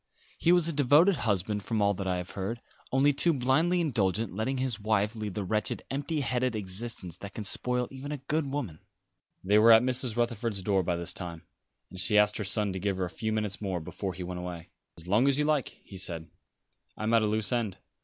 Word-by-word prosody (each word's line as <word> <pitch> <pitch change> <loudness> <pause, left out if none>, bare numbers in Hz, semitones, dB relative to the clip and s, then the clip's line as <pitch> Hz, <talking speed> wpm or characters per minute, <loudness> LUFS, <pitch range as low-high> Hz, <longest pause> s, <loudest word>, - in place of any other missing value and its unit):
He 170 - +3
was 175 -2 +4
a 165 - 0
devoted 150 +7 +5
husband, 100 +1 0
from 110 +2 -2
all 100 0 +3
that 95 0 -4
I 90 -1 0
have 90 0 -6
heard; 100 +4 -4 0.3
only 140 +2 +4
too 165 +5 +4
blindly 155 +7 +2
indulgent, 110 - 0
letting 110 +7 -2
his 130 -3 -2
wife 105 +1 0
lead 105 -3 -5
the 105 - -2
wretched, 105 +3 -1
empty 145 +3 -2
headed 125 -2 0
existence 95 -3 -3
that 100 +1 -9
can 110 - -4
spoil 125 +4 -1
even 135 +2 -7
a 150 - -2
good 145 +2 -2
woman." 120 - -4 0.6
They 105 +3 +4
were 115 +2 +7
at 110 +1 +8
Mrs. 125 -2 0
Rutherford's 115 -4 -1
door 95 -1 +2
by 90 -1 -1
this 85 0 -2
time, 85 -2 -7 0.5
and 95 - -7
she 105 +2 +4
asked 105 0 +4
her 105 - -2
son 105 0 +1
to 95 - -4
give 100 0 -1
her 95 - 0
a 90 - -7
few 110 -1 -3
minutes 105 -2 -2
more 95 -4 -2
before 95 +4 -5
he 90 - -6
went 90 0 -5
away. 90 -2 -7 0.3
"As 85 +1 -7
long 105 +8 +3
as 140 -1 +3
you 150 - +1
like," 150 -4 0
he 95 - -11
said. 80 -3 -2 0.7
"I - - -5
am 110 +2 +1
at 115 - +5
a 110 - +1
loose 105 -1 0
end. 115 -6 -1
110 Hz, 230 wpm, -29 LUFS, 95-130 Hz, 0.7 s, at